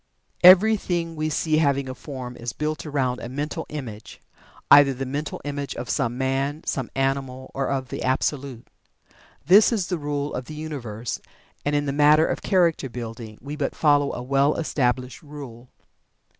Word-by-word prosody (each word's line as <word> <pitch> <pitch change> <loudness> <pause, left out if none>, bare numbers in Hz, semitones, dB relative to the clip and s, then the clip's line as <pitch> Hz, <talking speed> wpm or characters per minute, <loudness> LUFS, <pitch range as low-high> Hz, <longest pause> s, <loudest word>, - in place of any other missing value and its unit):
Everything 180 -3 +5
we 155 0 -1
see 155 0 +1
having 140 -3 +2
a 130 - -4
form 130 -2 -8
is 120 -1 -5
built 155 +1 -3
around 130 -4 -1
a 120 - -7
mental 145 +4 -4
image 120 -8 -8 0.5
either 140 -2 +8
the 135 +2 -4
mental 145 +3 -4
image 145 -1 -4
of 120 - -4
some 120 +1 -1
man, 135 +3 -1
some 130 -4 -2
animal, 135 -1 -2
or 135 -1 -1
of 135 -2 -2
the - - -5
Absolute. 130 -1 -1 0.8
This 200 - +7
is 210 -6 0
the 180 -3 -1
rule 145 0 -3
of 125 - -4
the 155 - -9
universe, 125 -8 -5 0.4
and 145 +1 0
in 145 0 +1
the 140 - -1
matter 150 +2 +5
of - - -2
character 170 -7 +2
building 115 -2 -7
we 145 +2 -6
but 145 -2 -2
follow 145 -2 +3
a 125 - -5
well 140 +3 +2
established 130 -4 -1
rule. 135 -6 -10
140 Hz, 170 wpm, -24 LUFS, 130-150 Hz, 0.8 s, either